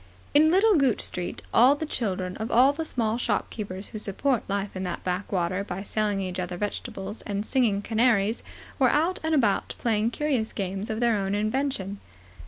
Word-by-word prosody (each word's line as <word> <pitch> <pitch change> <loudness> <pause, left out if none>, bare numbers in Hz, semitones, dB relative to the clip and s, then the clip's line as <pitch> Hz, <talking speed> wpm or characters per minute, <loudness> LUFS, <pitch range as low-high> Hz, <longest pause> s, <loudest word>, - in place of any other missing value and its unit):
In 305 +2 +6
Little 400 +6 +5
Gooch 270 -6 +2
Street 180 -1 -3
all 255 +5 +6
the 315 - -4
children 190 -9 -2
of 220 +1 -4
all 260 +4 +5
the 320 +2 -4
small 230 -5 -1
shopkeepers 200 -5 -3
who 215 - -6
support 230 +5 0
life 200 0 -2
in 185 - -4
that 180 -2 -4
backwater 185 0 -1
by 195 -1 -5
selling 210 -1 -1
each 185 -1 -4
other 180 0 -3
vegetables 200 +1 -4
and 205 0 -3
singing 220 -7 +1
canaries 225 -1 +2 0.4
were 260 -2 +5
out 330 +7 +1
and 320 0 +1
about 220 -8 +1
playing 220 -1 +1
curious 255 -4 -1
games 195 +1 -3
of 220 +1 -2
their 235 -2 +3
own 195 -1 -1
invention. 215 -3 -1
215 Hz, 180 wpm, -26 LUFS, 195-255 Hz, 0.4 s, In